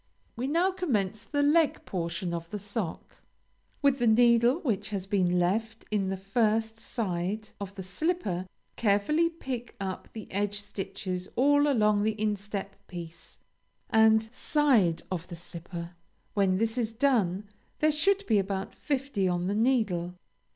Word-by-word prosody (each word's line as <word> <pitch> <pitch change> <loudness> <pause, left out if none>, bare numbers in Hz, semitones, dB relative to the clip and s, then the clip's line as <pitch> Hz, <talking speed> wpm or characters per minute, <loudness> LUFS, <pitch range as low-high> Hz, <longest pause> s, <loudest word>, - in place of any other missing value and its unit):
We 250 +3 -2
now 340 +6 +2
commence 220 - -1
the 290 -1 0
leg 305 +2 +3
portion 175 0 -3
of 170 -1 -4
the 210 - -4
sock. 200 -3 -5 0.7
With 280 -1 +4
the 240 - +2
needle 235 +2 +5
which 220 -9 -1
has 195 -3 -3
been 185 -3 +2
left 220 +6 0
in 200 -3 +1
the 190 - -2
first 220 +3 0
side 205 -1 -3
of 200 -1 -6
the 190 - -6
slipper 195 - -2 0.3
carefully 235 +11 +2
pick 260 -8 -6
up 190 -1 -4
the 220 -2 -7
edge 205 +1 -1
stitches 190 -2 -5
all 290 +3 +4
along 210 -6 +3
the 215 0 0
instep 205 -1 -2
piece 170 -2 -9 0.5
and 220 0 +6
side 250 - +2
of 180 -1 -3
the 175 - -7
slipper; 170 0 -8 0.4
when 195 -2 +2
this 225 +3 0
is 225 -2 0
done, 220 -6 +1 0.3
there 310 0 +3
should 390 +7 +2
be 215 - +3
about 195 0 -3
fifty 270 -9 -1
on 175 -1 0
the 195 - 0
needle. 205 -7 +1
210 Hz, 150 wpm, -29 LUFS, 190-245 Hz, 0.7 s, and